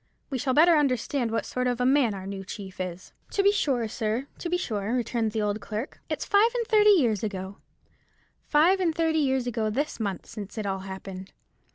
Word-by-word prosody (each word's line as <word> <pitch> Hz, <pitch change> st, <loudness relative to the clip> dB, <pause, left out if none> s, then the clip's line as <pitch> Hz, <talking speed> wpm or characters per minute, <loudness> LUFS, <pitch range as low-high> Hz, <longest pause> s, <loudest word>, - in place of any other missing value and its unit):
We 265 Hz, -, -1 dB
shall 260 Hz, 0 st, 0 dB
better 335 Hz, +2 st, +6 dB
understand 260 Hz, -2 st, 0 dB
what 225 Hz, -, -1 dB
sort 250 Hz, 0 st, -2 dB
of 245 Hz, -1 st, -1 dB
a 250 Hz, -, +1 dB
man 260 Hz, -5 st, +3 dB
our 190 Hz, -1 st, -7 dB
new 195 Hz, 0 st, -5 dB
chief 190 Hz, -1 st, -8 dB
is." 185 Hz, 0 st, -6 dB, 0.2 s
"To 395 Hz, -, +2 dB
be 400 Hz, -, +6 dB
sure, 265 Hz, -, 0 dB
sir, 225 Hz, +2 st, -2 dB
to 345 Hz, -, -4 dB
be 355 Hz, -, +1 dB
sure," 220 Hz, -, -2 dB
returned 235 Hz, -2 st, 0 dB
the 215 Hz, 0 st, -1 dB
old 210 Hz, +1 st, -1 dB
clerk. 220 Hz, +5 st, -5 dB
"It's -, -, -2 dB
five 415 Hz, +3 st, +4 dB
and 475 Hz, -1 st, 0 dB
thirty 425 Hz, -1 st, +5 dB
years 245 Hz, -, +4 dB
ago,—five 215 Hz, -, -2 dB
and 335 Hz, -4 st, +1 dB
thirty 320 Hz, -1 st, +1 dB
years 265 Hz, -3 st, +1 dB
ago 225 Hz, -3 st, -1 dB
this 280 Hz, +7 st, -2 dB
month, 200 Hz, -4 st, -3 dB
since 210 Hz, 0 st, -8 dB
it 215 Hz, -, -3 dB
all 195 Hz, -1 st, -1 dB
happened. 190 Hz, 0 st, -8 dB
240 Hz, 205 wpm, -27 LUFS, 205-295 Hz, 0.2 s, better